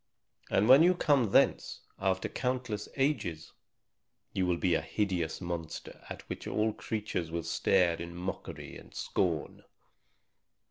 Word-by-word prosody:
And 105 - +3
when 130 +4 +9
you 180 +2 +5
come 140 - +3
thence, - - +2 0.2
after 95 -1 0
countless 125 -5 -2
ages, 135 - -1 0.8
you 95 -1 +1
will 90 -1 +1
be 90 0 +2
a 80 - +2
hideous 90 -6 -1
monster 85 -3 -6
at - - -8
which - - -6
all 110 0 +1
creatures 105 -8 -3
will 85 0 -3
stare 85 +1 +2
in 85 0 -7
mockery 90 +2 -6
and - - -15
scorn." 85 -5 -1
95 Hz, 135 wpm, -31 LUFS, 85-110 Hz, 0.8 s, when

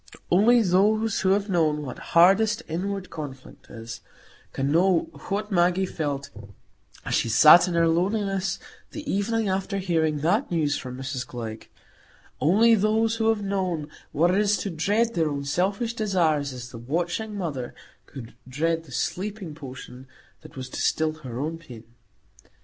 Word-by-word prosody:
Only 225 +6 +5
those 210 +4 +2
who 190 - +2
have 200 +1 +2
known 155 -5 +1
what 130 -3 -7 0.2
hardest 210 +6 +5
inward 185 +3 -4
conflict 145 -5 -9
is, 115 0 -9 0.5
can 135 +1 -1
know 175 +2 +2 0.2
what 210 +2 -2
Maggie 180 +1 +2
felt 145 -6 -4 0.7
as - - -3
she 115 - +1
sat 155 +10 +8
in 175 - -2
her 165 0 +3
loneliness 195 +2 0 0.4
the 305 -2 -7
evening 220 0 0
after 195 +1 -1
hearing 160 -5 0
that 210 - +1
news 155 -4 0
from 125 -2 -6
Mrs 130 -1 -4
Glegg,—only 150 - -2
those 220 +2 +2
who 225 0 +2
have 220 -2 0
known 185 -6 -2 0.2
what 170 +4 +2
it 200 - +3
is 210 0 +2
to 200 - -4
dread 205 +8 +1
their 160 -5 +1
own 140 -1 -4
selfish 195 +10 -1
desires 170 -10 0
as 125 -1 -8
the 115 - -9
watching 175 - -3
mother 140 -10 -4 0.4
would 120 -4 -8 0.2
dread 165 +4 -1
the 135 - -15
sleeping 185 - -3
potion 130 -3 -10 0.3
that - - -14
was 130 -1 -5
to - - -5
still 155 0 +1
her 130 -6 -8
own 160 +3 -3
pain. 125 -9 -12
175 Hz, 155 wpm, -25 LUFS, 145-200 Hz, 0.7 s, sat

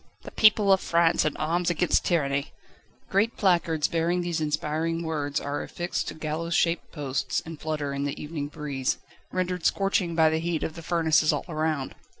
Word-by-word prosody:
"The - - -9
people 210 -2 +5
of 190 - +3
France 170 -2 +3
in 155 - -1
arms 170 +3 0
against 175 +1 +2
tyranny!" 140 -4 0 0.6
Great 205 +4 +2
placards, 170 -5 +2
bearing 170 +2 0
these 175 -2 -2
inspiriting 155 +2 -1
words, 145 -3 -1
are 145 +1 -3
affixed 175 0 -3
to - - -5
gallows 160 +2 -3
shaped 170 0 +1
posts, 140 -4 -2
and 160 -2 -9
flutter 150 -3 -2
in 140 +1 -2
the 140 - -3
evening 150 -1 -4
breeze, 140 -3 -2 0.3
rendered 180 -1 -2
scorching 195 -3 +1
by 160 -1 +5
the 160 - +1
heat 165 -1 -2
of 160 - -3
the 165 - -9
furnaces 160 -3 +3
all - - -2
around. 155 -4 -2
160 Hz, 175 wpm, -26 LUFS, 150-175 Hz, 0.6 s, people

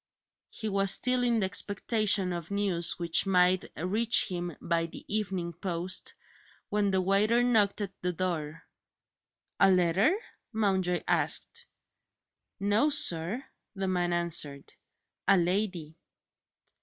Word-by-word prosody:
He 220 - -6
was 195 -1 +3
still 250 +5 +3
in 235 -3 +1
expectation 200 0 +1
of 170 -1 -6
news 200 -4 0
which 170 +2 +2
might 180 -1 +3
reach 210 - +3
him 175 -2 -5
by 165 -1 -1
the - - -12
evening 190 -5 -2
post, 175 +1 -4 0.5
when 205 -1 0
the 190 -1 +1
waiter 210 +6 +2
knocked 215 -4 +2
at 195 -2 -4
the 180 - -1
door. 165 -3 -4 1.0
"A 195 - +5
letter?" 185 - +2 0.4
Mountjoy 190 -5 0
asked. - - 0 0.9
"No, 205 +8 +2
sir," 210 - 0 0.3
the 195 0 -3
man 180 -1 -1
answered; 160 -5 -2 0.5
"a 195 - +5
lady." 175 -3 -2
190 Hz, 120 wpm, -28 LUFS, 175-205 Hz, 1.0 s, A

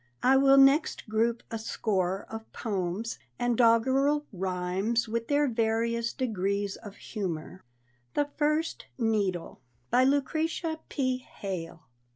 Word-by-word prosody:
I 260 +1 +6
will 270 0 +6
next 275 +1 +4
group 225 +2 +1
a 225 - -3
score 195 -4 -1
of 225 0 -8
poems 200 0 -3 0.2
and 245 -1 +1
doggerel 265 +6 +3
rhymes 190 +5 -1
with 230 +1 -2
their 290 0 +3
various 230 0 0
degrees 200 -5 -1
of 205 -3 -11
humor. 185 -4 -5 0.5
THE 290 - +3
FIRST 305 +2 0
NEEDLE. 205 - -1 0.3
BY 250 +2 +5
LUCRETIA 315 +4 0
P. 260 -3 0
HALE. 180 -9 -7
230 Hz, 120 wpm, -29 LUFS, 200-265 Hz, 0.5 s, I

